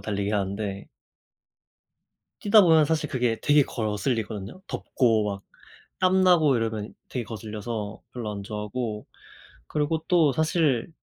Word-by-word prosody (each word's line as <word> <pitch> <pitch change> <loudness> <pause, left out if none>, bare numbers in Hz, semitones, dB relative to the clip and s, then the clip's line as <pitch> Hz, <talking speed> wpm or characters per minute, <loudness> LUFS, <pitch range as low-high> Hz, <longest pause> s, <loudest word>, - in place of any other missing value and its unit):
달리기 100 -1 -2
하는데. 100 -1 -2 1.5
뛰다보면 180 -7 +6
사실 155 -1 0
그게 120 -4 0
되게 145 -1 +4
거슬리거든요. 110 - -3
덥고 115 -5 +1
막 100 -1 -5 0.6
땀나고 185 -6 +4
이러면 110 -2 -3 0.2
되게 125 - -3
거슬려서 110 0 -6
별로 115 -4 -4
안 100 -1 -6
좋아하고 105 +1 -4 0.6
그리고 155 +1 -1
또 165 -6 +4
사실 155 -5 +1
115 Hz, 270 characters per minute, -26 LUFS, 105-155 Hz, 1.5 s, 뛰다보면